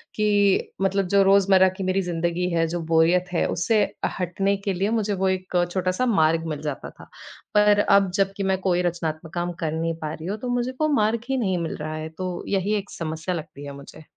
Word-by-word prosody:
कि 205 -2 +2
मतलब 195 0 +1
जो 200 +1 +4
रोजमर्रा 195 -1 +5
की 195 - -3
मेरी 185 +1 +1
ज़िंदगी 175 0 -1
है, 165 -1 +1
जो 175 +2 -3
बोरियत 170 +3 +4
है, - - +1
उससे 215 +5 +1 0.4
हटने 195 +3 0
के 195 -1 -2
लिए 195 +3 0
मुझे 220 -2 0
वो 190 0 0
एक 185 -1 0
छोटा-सा 185 +5 0
मार्ग 165 -7 +2
मिल 150 -2 -4
जाता 150 -3 -5
था। - - -16 0.5
पर 210 0 +5
अब 200 -2 +4
जब 195 -1 +2
की 200 - -2
मैं 190 -1 +1
कोई 180 -2 +1
रचनात्मक 165 -2 -3
काम 175 0 -2
कर 155 - 0
नहीं 165 +1 -1
पा 155 -1 -3
रही 160 +1 -7
हूँ, 205 +3 -2
तो 250 +2 -4
मुझको 255 +5 0
मार्ग 220 -2 +2
ही 270 - +1
नहीं 190 -6 0
मिल 165 -1 -3
रहा 155 +1 -5
है, 155 0 -5
तो 180 +2 -5
यही 200 +1 0
एक 200 0 -6
समस्या 160 +2 -4
लगती 150 -3 -8
है 140 - -6
मुझे। 140 +3 -12
185 Hz, 215 wpm, -24 LUFS, 165-200 Hz, 0.5 s, रोजमर्रा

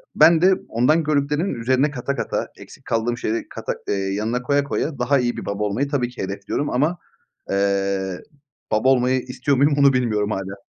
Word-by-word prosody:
ben 165 -1 +6
de 190 +2 +6 0.2
ondan 140 +8 +2
gördüklerimin 150 +4 0
üzerine 130 +5 +1
kata 140 0 -3
kata, - - -2
eksik - - -14
kaldığım 115 +1 -1
şeyleri 115 0 -2
kata - - -4
eee, - - 0
yanına 105 +5 -1
koya 140 +2 +2
koya 140 0 -3
daha 135 +3 +2
iyi 120 -1 -1
bir - - -6
baba 100 +1 -2
olmayı 105 +7 -1
tabii 130 -4 0
ki 125 - -8
hedefliyorum 100 +9 -3
ama, 150 +8 +1 0.5
eee, 100 -1 0 0.5
baba 110 +5 +3
olmayı 130 0 +3
istiyor 130 +2 -1
muyum 145 +3 +4
onu 140 -1 +6
bilmiyorum 110 -5 0
hâlâ. 95 -1 -4
125 Hz, 180 wpm, -22 LUFS, 105-140 Hz, 0.5 s, ben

